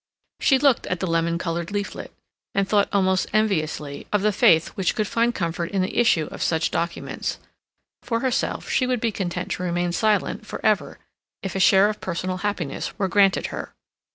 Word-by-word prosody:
She 270 - +4
looked 270 -2 +2
at 180 - -2
the - - -1
lemon 165 -1 0
colored 170 -1 -3
leaflet, 205 0 -4 0.4
and 195 0 +2
thought 205 0 +2
almost 190 -1 +2
enviously 155 -9 -1
of 210 -1 +1
the 215 - +3
faith 180 -6 +4
which 190 -2 -1
could 215 - 0
find 235 +2 +1
comfort 170 -1 -2
in 195 -2 0
the 185 - -4
issue 205 -10 +3
of - - -8
such 160 -1 +1
documents; 170 0 -3 0.6
for 230 -1 -2
herself 260 -2 -1
she 255 - +1
would 250 -1 0
be 230 0 0
content 180 -1 -4
to - - -3
remain 175 0 -1
silent 215 +3 +1
for - - -6
ever - - +1 0.5
if 195 - -4
a - - 0
share 195 +1 +6
of 210 0 -4
personal 185 +1 -3
happiness 195 -7 -3
were 200 -3 0
granted 195 +1 +3
her. - - -6
190 Hz, 185 wpm, -23 LUFS, 170-210 Hz, 0.6 s, share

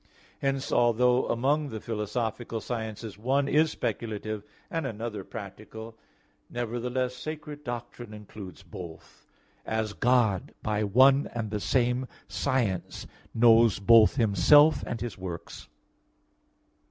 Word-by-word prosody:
Hence, 135 0 -1
although 125 +1 +3
among 140 +5 +1
the 110 - -5
philosophical 115 +1 -3
sciences 110 -2 -5
one 135 +5 +1
is 155 +3 +3
speculative 110 -5 -4 0.3
and 165 -4 -2
another 110 -3 -5
practical, 110 +2 -9 0.5
nevertheless 125 +2 -2
sacred 150 +1 -7
doctrine 120 -2 -6
includes 105 -2 -10
both; 85 -3 -11 0.4
as 110 -1 -2
God, 115 -6 +1
by 105 0 0
one 130 +7 +5
and 110 -3 -3
the 105 - -1
same 125 +3 +1 0.2
science, 115 -9 -1 0.3
knows 115 -1 +5
both 110 +2 +6
Himself 145 +7 +5
and 115 - -3
His 120 -5 -5
works. 90 -3 -7
115 Hz, 110 wpm, -28 LUFS, 105-125 Hz, 0.5 s, both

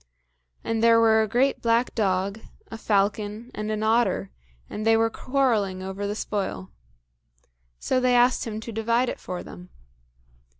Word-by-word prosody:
And 225 -1 -1
there 230 0 +5
were 220 -1 +4
a 220 - 0
great 255 +6 +1
black 235 +1 +1
dog, 195 0 -1 0.3
a 225 - -6
falcon, 210 +3 -1
and 215 0 -4
an 215 0 -2
otter, 220 - +1 0.4
and 215 - -6
they 225 0 +4
were 225 0 +1
quarrelling 225 -10 0
over 190 +2 -4
the 205 - -3
spoil. 190 - -4 1.1
So 255 - 0
they 250 -1 +2
asked 245 +1 +3
him 215 -1 -4
to 230 - -7
divide 230 +3 0
it - - -6
for 180 -1 -6
them. 180 0 -12
220 Hz, 160 wpm, -25 LUFS, 200-230 Hz, 1.1 s, there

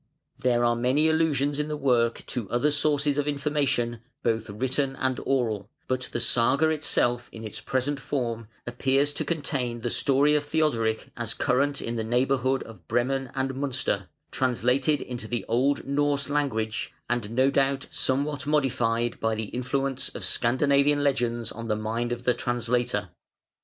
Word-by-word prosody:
There 120 -1 +2
are 120 0 +3
many 130 +6 +2
allusions 145 -3 +1
in 150 - 0
the 150 -1 -3
work 120 -4 +2
to 115 -7 -4
other 120 +6 +2
sources 145 -1 +1
of 145 - -1
information 140 -5 0 0.2
both 115 -2 0
written 130 +5 -1
and 130 -1 -1
oral, 115 -7 0 0.2
but 130 0 -2
the - - -2
Saga 125 +6 +3
itself 120 -6 0
in 115 - -9
its 110 - -7
present 135 +2 -1
form 115 -5 -3 0.2
appears 135 +4 +1
to - - -1
contain 130 -7 -2
the 120 0 -2
story 140 +2 +3
of 150 -1 +2
Theodoric 145 -8 0
as 120 -2 -3
current 140 +2 +1
in 115 0 -3
the 110 - -1
neighbourhood 130 +3 +1
of 95 -8 -13
Bremen 135 +2 0
and 135 0 0
Münster, 135 -1 -1 0.2
translated 130 +3 +1
into 120 -3 -6
the 120 0 -2
old 130 +5 +1
Norse 140 0 0
language, 115 -7 -1 0.2
and 120 -3 -1
no 130 +4 +3
doubt 135 0 +1
somewhat 140 +2 -1
modified 120 -5 +1
by 110 0 +1
the 110 -1 -4
influence 130 +1 -2
of - - -4
Scandinavian 140 +4 +3
legends 120 -5 0
on 115 +1 -7
the 105 - +1
mind 115 +3 -2
of 120 0 -3
the 125 - +3
translator. 120 -5 -1
130 Hz, 160 wpm, -26 LUFS, 120-140 Hz, 0.2 s, are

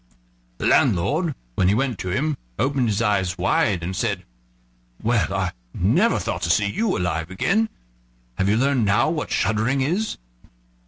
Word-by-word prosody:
The - - -4
landlord, 150 - +2 0.2
when 90 - +2
he 100 - +3
went 125 -4 -1
to 95 - -4
him, 145 +11 0 0.2
opened 130 0 +1
his 105 +1 0
eyes 95 -4 +1
wide, 90 0 +1
and 95 +2 -3
said: - - -1 0.8
"Well, 115 -3 +1
I 95 -2 -1 0.2
never - - +3
thought - - -3
to - - -1
see 105 - +3
you 190 - 0
alive 85 -2 -2
again. 195 - +1 0.7
Have 95 +1 +2
you 105 - +3
learned 135 -1 +2
now 100 +9 +3
what 155 -3 -3
shuddering 110 +6 +1
is?" 180 +11 -1
110 Hz, 160 wpm, -23 LUFS, 95-140 Hz, 0.8 s, he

